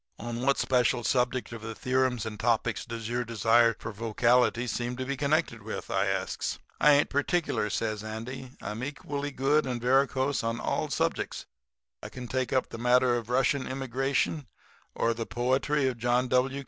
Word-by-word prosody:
"'On 120 Hz, +1 st, -5 dB
what 140 Hz, +2 st, +2 dB
special 125 Hz, -1 st, +2 dB
subject 125 Hz, +2 st, 0 dB
of 115 Hz, -2 st, -7 dB
the 110 Hz, 0 st, -6 dB
theorems 130 Hz, -2 st, 0 dB
and 105 Hz, -2 st, -6 dB
topics 115 Hz, -1 st, 0 dB
does 115 Hz, -1 st, -5 dB
your 120 Hz, +1 st, -1 dB
desire 115 Hz, +1 st, +3 dB
for 110 Hz, -, -6 dB
vocality 115 Hz, +3 st, +2 dB
seem 120 Hz, 0 st, -2 dB
to 130 Hz, -, -3 dB
be 140 Hz, +1 st, -2 dB
connected 140 Hz, -4 st, 0 dB
with?' 110 Hz, +2 st, -6 dB
I -, -, +1 dB
asks. -, -, -2 dB, 0.2 s
"'I 150 Hz, -, +6 dB
ain't 145 Hz, +1 st, +3 dB
particular,' 145 Hz, -5 st, 0 dB
says 110 Hz, +1 st, -2 dB
Andy. 115 Hz, +4 st, -6 dB
'I -, -, -3 dB
am 110 Hz, +3 st, -5 dB
equally 145 Hz, +1 st, -4 dB
good 140 Hz, +2 st, +1 dB
and 125 Hz, -2 st, -2 dB
varicose 130 Hz, +2 st, +2 dB
on 115 Hz, +1 st, -1 dB
all -, -, -1 dB
subjects. -, -, -1 dB, 0.6 s
I -, -, -7 dB
can 125 Hz, -1 st, -8 dB
take 130 Hz, +1 st, -1 dB
up 130 Hz, -1 st, +1 dB
the 115 Hz, -, -7 dB
matter 125 Hz, +1 st, +4 dB
of 115 Hz, -1 st, -4 dB
Russian 130 Hz, +2 st, +1 dB
immigration, 135 Hz, +3 st, -1 dB, 0.5 s
or 115 Hz, -, +1 dB
the 115 Hz, 0 st, -5 dB
poetry 130 Hz, +3 st, +1 dB
of 125 Hz, -3 st, -2 dB
John 120 Hz, +2 st, +2 dB
W. 130 Hz, +2 st, +2 dB
125 Hz, 180 wpm, -28 LUFS, 115-135 Hz, 0.6 s, I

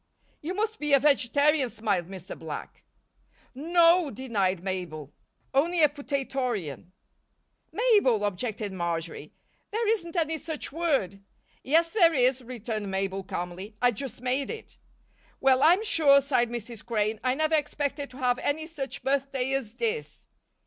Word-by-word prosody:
"You 345 Hz, +5 st, -4 dB
must 440 Hz, +2 st, -1 dB
be 295 Hz, -1 st, 0 dB
a 275 Hz, -, +7 dB
vegetarian," 285 Hz, 0 st, +3 dB
smiled 205 Hz, -6 st, -1 dB
Mr. 190 Hz, -1 st, -8 dB
Black. -, -, -8 dB, 0.7 s
"N 305 Hz, +6 st, -7 dB
no," 340 Hz, -1 st, +5 dB
denied 200 Hz, -8 st, -1 dB
Mabel. 170 Hz, -6 st, -5 dB, 0.4 s
"Only 325 Hz, +5 st, +3 dB
a 300 Hz, -, +7 dB
potatorian." 260 Hz, -, -3 dB, 0.8 s
"Mabel!" 400 Hz, -, +3 dB
objected 205 Hz, +1 st, -3 dB
Marjory. 165 Hz, -4 st, -4 dB, 0.4 s
"There 445 Hz, +1 st, -1 dB
isn't 385 Hz, -6 st, 0 dB
any 320 Hz, -2 st, 0 dB
such 315 Hz, -2 st, -5 dB
word." 275 Hz, -, 0 dB, 0.4 s
"Yes, 330 Hz, +4 st, +3 dB
there 340 Hz, -7 st, +5 dB
is," 255 Hz, 0 st, +3 dB
returned 225 Hz, -4 st, -5 dB
Mabel, 195 Hz, 0 st, -2 dB
calmly. 185 Hz, +3 st, -6 dB
"I 245 Hz, 0 st, +4 dB
just 245 Hz, +1 st, -7 dB
made 260 Hz, +2 st, 0 dB
it." 450 Hz, -, -8 dB, 0.6 s
"Well, 265 Hz, -1 st, +4 dB
I'm 355 Hz, +8 st, +5 dB
sure," 295 Hz, -9 st, +5 dB
sighed 255 Hz, -4 st, +1 dB
Mrs. 235 Hz, -1 st, -6 dB
Crane, 215 Hz, -1 st, -1 dB
"I 255 Hz, 0 st, +2 dB
never 310 Hz, +2 st, 0 dB
expected 290 Hz, -1 st, -1 dB
to 255 Hz, -, -13 dB
have 250 Hz, -2 st, +1 dB
any 315 Hz, +2 st, -1 dB
such 295 Hz, -5 st, -6 dB
birthday 270 Hz, -1 st, 0 dB
as 240 Hz, -5 st, -2 dB
this." 460 Hz, 0 st, -3 dB
265 Hz, 140 wpm, -27 LUFS, 210-310 Hz, 0.8 s, a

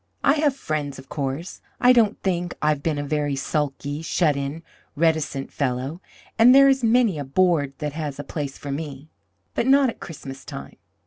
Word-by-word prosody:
I 280 Hz, -, +5 dB
have 295 Hz, -3 st, +2 dB
friends, 150 Hz, -, -3 dB
of 135 Hz, 0 st, -13 dB
course; 140 Hz, +4 st, -4 dB, 0.2 s
I 250 Hz, 0 st, +6 dB
don't 225 Hz, -3 st, +3 dB
think 175 Hz, -2 st, -1 dB
I've 150 Hz, -1 st, +1 dB
been 155 Hz, -1 st, -1 dB
a 145 Hz, -, -2 dB
very 145 Hz, -1 st, -1 dB
sulky, 145 Hz, +1 st, -2 dB
shut 160 Hz, -2 st, +1 dB
in, 140 Hz, +4 st, -4 dB, 0.3 s
reticent 155 Hz, -3 st, 0 dB
fellow; 135 Hz, +5 st, -2 dB, 0.4 s
and 245 Hz, +3 st, +8 dB
there 275 Hz, 0 st, +8 dB
is 270 Hz, -2 st, +3 dB
many 225 Hz, -7 st, +3 dB
a -, -, -2 dB
board 145 Hz, -1 st, +2 dB
that 150 Hz, -2 st, -4 dB
has 150 Hz, -3 st, -4 dB
a 145 Hz, -, -5 dB
place 145 Hz, -1 st, -5 dB
for 140 Hz, -, -6 dB
me 145 Hz, 0 st, -6 dB, 0.4 s
but 235 Hz, -, 0 dB
not 275 Hz, 0 st, +5 dB
at -, -, -17 dB
Christmastime. 135 Hz, -4 st, -9 dB
150 Hz, 180 wpm, -23 LUFS, 140-185 Hz, 0.4 s, and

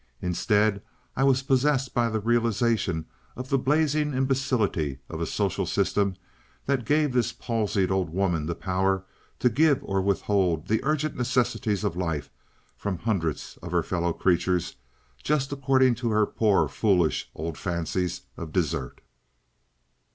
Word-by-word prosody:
Instead, 100 Hz, +3 st, +1 dB, 0.3 s
I 135 Hz, -, +1 dB
was 135 Hz, -1 st, +3 dB
possessed 135 Hz, -1 st, +1 dB
by 120 Hz, -1 st, +2 dB
a 110 Hz, -1 st, -1 dB
realization 115 Hz, -6 st, +1 dB, 0.3 s
of 130 Hz, +1 st, -7 dB
the 135 Hz, -, +2 dB
blazing 150 Hz, +1 st, +1 dB
imbecility 130 Hz, -, 0 dB
of -, -, -5 dB
a -, -, -1 dB
social -, -, -1 dB
system 100 Hz, -2 st, +1 dB, 0.5 s
that 135 Hz, -4 st, 0 dB
gave 150 Hz, -2 st, +2 dB
this 125 Hz, -2 st, +1 dB
palsied 105 Hz, -5 st, -1 dB
old 95 Hz, -3 st, 0 dB
woman 85 Hz, -3 st, 0 dB
the 85 Hz, -, -2 dB
power 95 Hz, +1 st, 0 dB, 0.3 s
to -, -, +2 dB
give 145 Hz, +4 st, +4 dB
or 95 Hz, -1 st, 0 dB
withhold 95 Hz, -4 st, +1 dB
the 110 Hz, +3 st, +1 dB
urgent 155 Hz, +1 st, 0 dB
necessities 120 Hz, -5 st, 0 dB
of 85 Hz, -, -1 dB
life 80 Hz, -5 st, -3 dB, 0.4 s
from 100 Hz, -3 st, -3 dB
hundreds 85 Hz, -7 st, -2 dB
of -, -, -7 dB
her -, -, +2 dB
fellow 85 Hz, -1 st, -1 dB
creatures 90 Hz, 0 st, +1 dB, 0.5 s
just 140 Hz, -2 st, 0 dB
according 130 Hz, -2 st, +3 dB
to 120 Hz, 0 st, -2 dB
her 105 Hz, -1 st, +3 dB
poor, 105 Hz, -2 st, +2 dB
foolish 90 Hz, -7 st, +1 dB
old 80 Hz, 0 st, -4 dB
fancies 90 Hz, 0 st, -2 dB, 0.2 s
of 80 Hz, -2 st, -6 dB
desert. 85 Hz, -5 st, -2 dB
105 Hz, 145 wpm, -26 LUFS, 90-130 Hz, 0.5 s, give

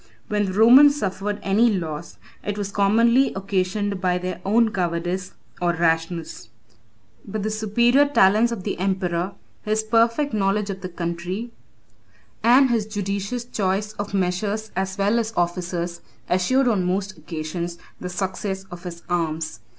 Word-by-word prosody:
When 210 Hz, -1 st, +1 dB
the 190 Hz, -, -3 dB
Romans 255 Hz, +8 st, +7 dB
suffered 200 Hz, 0 st, -2 dB
any 210 Hz, +5 st, +4 dB
loss, 170 Hz, -5 st, -4 dB, 0.3 s
it 205 Hz, 0 st, -3 dB
was 200 Hz, -1 st, -3 dB
commonly 230 Hz, +6 st, +3 dB
occasioned 195 Hz, +1 st, -1 dB
by 180 Hz, -1 st, +1 dB
their 180 Hz, 0 st, -5 dB
own 220 Hz, +3 st, +3 dB
cowardice 175 Hz, +1 st, -2 dB, 0.3 s
or 175 Hz, -1 st, +2 dB
rashness; 165 Hz, 0 st, -1 dB, 0.7 s
but 210 Hz, -1 st, -4 dB
the 215 Hz, -, -1 dB
superior 235 Hz, +6 st, +3 dB
talents 220 Hz, -3 st, +4 dB
of 220 Hz, -6 st, -4 dB
the -, -, -3 dB
emperor, 185 Hz, -1 st, -1 dB, 0.3 s
his 215 Hz, +1 st, 0 dB
perfect 230 Hz, +5 st, +2 dB
knowledge 200 Hz, 0 st, +1 dB
of 190 Hz, 0 st, -7 dB
the 185 Hz, -, -5 dB
country, 175 Hz, +6 st, -4 dB, 0.9 s
and 255 Hz, +2 st, +5 dB
his 220 Hz, -3 st, +1 dB
judicious 200 Hz, +3 st, -3 dB
choice 205 Hz, -2 st, -1 dB
of 205 Hz, 0 st, -3 dB
measures 200 Hz, +4 st, -1 dB
as 190 Hz, +1 st, -2 dB
well 205 Hz, +4 st, +2 dB
as 225 Hz, -1 st, -3 dB
officers, 175 Hz, 0 st, -2 dB, 0.3 s
assured 250 Hz, +9 st, +2 dB
on 210 Hz, -6 st, +2 dB
most 190 Hz, +2 st, -1 dB
occasions 165 Hz, +1 st, -5 dB, 0.2 s
the 180 Hz, -, -5 dB
success 190 Hz, +1 st, -3 dB
of 175 Hz, 0 st, -8 dB
his 170 Hz, -1 st, -7 dB
arms. 160 Hz, -7 st, -2 dB
195 Hz, 145 wpm, -23 LUFS, 180-215 Hz, 0.9 s, Romans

